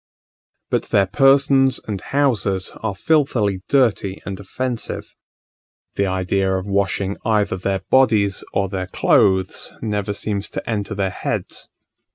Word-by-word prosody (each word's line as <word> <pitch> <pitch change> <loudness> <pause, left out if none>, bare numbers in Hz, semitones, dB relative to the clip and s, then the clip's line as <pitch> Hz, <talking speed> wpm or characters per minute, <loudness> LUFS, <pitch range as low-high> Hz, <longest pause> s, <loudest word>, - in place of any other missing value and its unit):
But - - +1
their 100 -1 +3
persons 135 +3 +4
and 100 -4 -3
houses 115 -9 0
are 110 -3 -2
filthily 110 - +1
dirty 110 -8 +2
and 95 -2 -5
offensive: 120 +5 -4 0.8
the 100 - 0
idea 95 +1 0
of 95 - -4
washing 100 0 -1
either 105 -3 +1
their 95 +1 -2
bodies 110 -7 +3
or 100 0 0
their 95 -1 -4
clothes 95 -1 +2
never 105 -2 -2
seems 100 -1 -3
to - - -6
enter 105 -1 -2
their 95 -2 -1
heads. - - -4
100 Hz, 130 wpm, -20 LUFS, 95-115 Hz, 0.8 s, persons